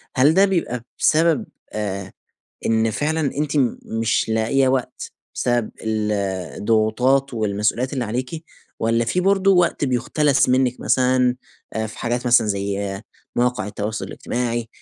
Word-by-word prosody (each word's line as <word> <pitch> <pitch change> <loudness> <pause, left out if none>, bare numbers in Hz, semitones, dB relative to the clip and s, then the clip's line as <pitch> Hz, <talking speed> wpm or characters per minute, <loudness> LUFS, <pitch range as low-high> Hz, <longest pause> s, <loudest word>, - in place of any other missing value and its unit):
هل 140 +4 +5
ده 195 +3 +5
بيبقى 165 - -1 0.2
بسبب، 160 -1 +3 0.3
آآ 100 -2 -4 0.5
إن 110 0 +2
فعلًا 155 +7 -1 0.2
أنتِ 150 -1 -1 0.3
مش 115 0 0
لاقية 115 +5 +2
وقت، 130 -1 -2 0.2
بسبب 120 -2 0
ال 110 -1 -1 0.5
الضغوطات 120 +5 +2
والمسئوليّات 110 +4 0
اللي 130 -3 -1
عليكِ 130 +8 -4 0.4
والّا 115 +1 +1
فيه 180 +10 0
برضه 195 0 +3
وقت 175 -5 +2
بيُختلس 135 +2 +2
منِّك 130 -1 +2
مثلًا، 125 -1 +2 0.4
آآ، 110 0 -2
في 110 - -11
حاجات 120 +1 -2
مثلًا 120 -2 +5
زي 100 -1 -2 0.3
مواقع 125 -4 0
التواصل 105 +1 -4
الاجتماعي، 120 -1 -3
120 Hz, 130 wpm, -21 LUFS, 110-135 Hz, 0.5 s, هل